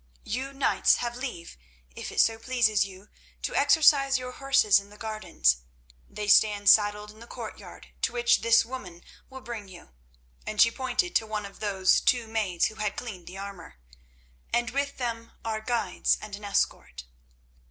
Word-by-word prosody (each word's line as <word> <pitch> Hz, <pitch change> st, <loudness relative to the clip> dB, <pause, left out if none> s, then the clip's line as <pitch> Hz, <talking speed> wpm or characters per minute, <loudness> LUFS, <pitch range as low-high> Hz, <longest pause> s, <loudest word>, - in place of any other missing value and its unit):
You 260 Hz, +5 st, -4 dB
knights 275 Hz, 0 st, +2 dB
have 240 Hz, -1 st, -4 dB
leave, 240 Hz, -, -7 dB, 0.4 s
if -, -, -6 dB
it -, -, -3 dB
so 225 Hz, 0 st, +3 dB
pleases 225 Hz, -4 st, +2 dB
you, 195 Hz, +1 st, -13 dB, 0.3 s
to -, -, -3 dB
exercise 280 Hz, -2 st, +4 dB
your 250 Hz, 0 st, -6 dB
horses 270 Hz, -6 st, +3 dB
in 200 Hz, 0 st, -13 dB
the 210 Hz, -, -15 dB
gardens. 190 Hz, -, 0 dB, 0.5 s
They 210 Hz, 0 st, -6 dB
stand 205 Hz, -1 st, +5 dB
saddled 210 Hz, 0 st, +2 dB
in 215 Hz, -, -18 dB
the 235 Hz, -, -12 dB
courtyard, -, -, -10 dB
to -, -, +1 dB
which 485 Hz, 0 st, +2 dB
this 230 Hz, 0 st, +4 dB
woman 205 Hz, -9 st, -9 dB, 0.3 s
will 265 Hz, 0 st, -10 dB
bring 230 Hz, -5 st, -7 dB
you," 180 Hz, -, -14 dB, 0.5 s
and 215 Hz, -, -6 dB
she 230 Hz, -, +6 dB
pointed 260 Hz, +8 st, -2 dB
to 220 Hz, -, -5 dB
one 215 Hz, -1 st, -4 dB
of 200 Hz, -, -12 dB
those 190 Hz, -3 st, +2 dB
two 245 Hz, -2 st, +2 dB
maids 210 Hz, -6 st, 0 dB
who 215 Hz, -, -3 dB
had 210 Hz, -1 st, -1 dB
cleaned 195 Hz, -8 st, -7 dB
the 185 Hz, -, -9 dB
armour, 195 Hz, -, -9 dB, 0.8 s
"and 240 Hz, -1 st, 0 dB
with 280 Hz, +1 st, -2 dB
them 230 Hz, -2 st, -4 dB
are 220 Hz, -1 st, -2 dB
guides 225 Hz, -4 st, 0 dB
and 210 Hz, -2 st, -8 dB
an 205 Hz, +1 st, -10 dB
escort." -, -, -2 dB
220 Hz, 175 wpm, -27 LUFS, 200-250 Hz, 0.8 s, she